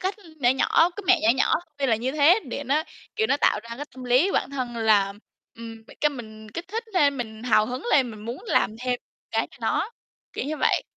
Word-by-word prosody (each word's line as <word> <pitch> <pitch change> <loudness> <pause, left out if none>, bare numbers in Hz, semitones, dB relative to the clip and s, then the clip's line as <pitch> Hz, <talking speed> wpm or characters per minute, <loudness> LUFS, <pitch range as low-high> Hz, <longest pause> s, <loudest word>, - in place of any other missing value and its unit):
cách 380 +1 -1 0.3
nhỏ 245 - +4
nhỏ, 325 +6 +3
cái 410 - -5
mẹo 370 -2 +6
nhỏ - - +3
nhỏ, - - +3 0.2
tuy 275 - +1
là 225 -4 +3
như 255 +4 -2
thế 310 +8 +5
để 280 +3 -5
nó, 290 +4 +1 0.3
kiểu, 440 +1 +2
nó - - +2
tạo 210 -7 +2
ra 235 0 -8
cái 290 - -5
tâm 255 -1 -9
lý 255 +10 +3
bản - - 0
thân 250 -4 -4
là, 210 -3 +3 0.4
ừm, 225 -1 -10 0.2
cái 300 - +3
mình 220 -4 -10
kích 335 - -7
thích 455 +3 -3
thêm, 285 -5 +3
mình 220 -2 -6
hào 215 -3 +3
hứng 250 +1 -5
lên, 255 -4 +4
mình 215 -1 -10
muốn 235 +3 -5
làm - - +2
thêm 250 -1 -1 0.3
cái - - 0
cho - - -17
nó, - - 0 0.4
kiểu - - -3
như 305 +2 -3
vậy. - - +2
255 Hz, 235 wpm, -25 LUFS, 230-300 Hz, 0.4 s, mẹo